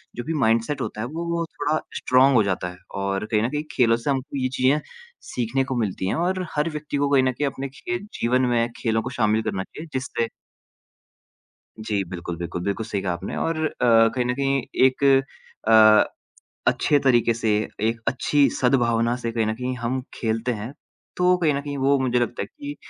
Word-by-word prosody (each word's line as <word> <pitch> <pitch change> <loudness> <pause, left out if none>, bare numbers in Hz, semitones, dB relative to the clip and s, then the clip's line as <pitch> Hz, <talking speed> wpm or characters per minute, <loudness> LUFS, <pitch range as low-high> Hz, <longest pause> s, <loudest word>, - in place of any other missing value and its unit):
जो 120 - -4
भी 165 - -3
माइंड-सेट 115 +1 +1
होता 105 - -4
है 120 - -2
वो 165 +4 -5
वो 170 -1 -1
थोड़ा 150 +2 +1 0.2
स्ट्रॉन्ग 130 +1 +4
हो 110 - +5
जाता 95 -2 -1
है 90 - -11 0.2
और 100 +1 -1
कहीं 105 -1 +3
न 120 - 0
कहीं 150 +1 -2
खेलों 115 -2 +3
से 120 +5 -4
हमको 135 +1 -2
ये 130 -1 0
चीज़ें 135 +4 +3 0.5
सीखने 125 +2 -1
को 130 -1 -3
मिलती 100 -5 -2
हैं - - 0
और 185 +2 -1
हर 150 +3 +1
व्यक्ति 150 -1 -4
को 140 0 +1
कहीं 135 -2 +4
न 130 - +2
कहीं 140 +3 -1
अपने 135 0 -4
खे 180 +6 -4 0.2
जीवन 125 +2 +2
में 115 0 +2
खेलों 110 -1 0
को 125 - -5
शामिल 110 -2 +1
करना 95 -1 -2
चाहिए। 160 +10 -10
जिससे 130 -3 -2 1.5
जी। 105 -2 -1
बिल्कुल, 85 -1 -5
बिल्कुल। 85 +1 -4
बिल्कुल 100 +3 -2
सही 100 -3 -3
कहा 90 -2 -1
आपने 85 - -5
और 160 -1 -1
अ, - - +1
कहीं 115 +1 +4
न 125 - 0
कहीं 135 -1 +1 0.2
एक 130 +1 +1 0.6
अ, 110 -1 +7 0.6
अच्छे 145 - +3
तरीके 120 -3 +3
से 110 -1 0 0.3
एक 115 +1 0
अच्छी 140 +2 +3
सद्भावना 120 -2 +2
से 115 -2 -3
कहीं 115 -1 0
न 110 - 0
कहीं 125 +1 -3
हम 125 +2 -2
खेलते 115 +2 -1
हैं। 110 +5 -6 0.4
तो 180 0 +4
कहीं 160 -4 +2
न 140 - -2
कहीं 145 -1 -5
वो 140 +1 +3
मुझे 125 -2 +1
लगता 120 - -2
है - - -2
कि 290 -1 -8
125 Hz, 205 wpm, -23 LUFS, 110-140 Hz, 1.5 s, अ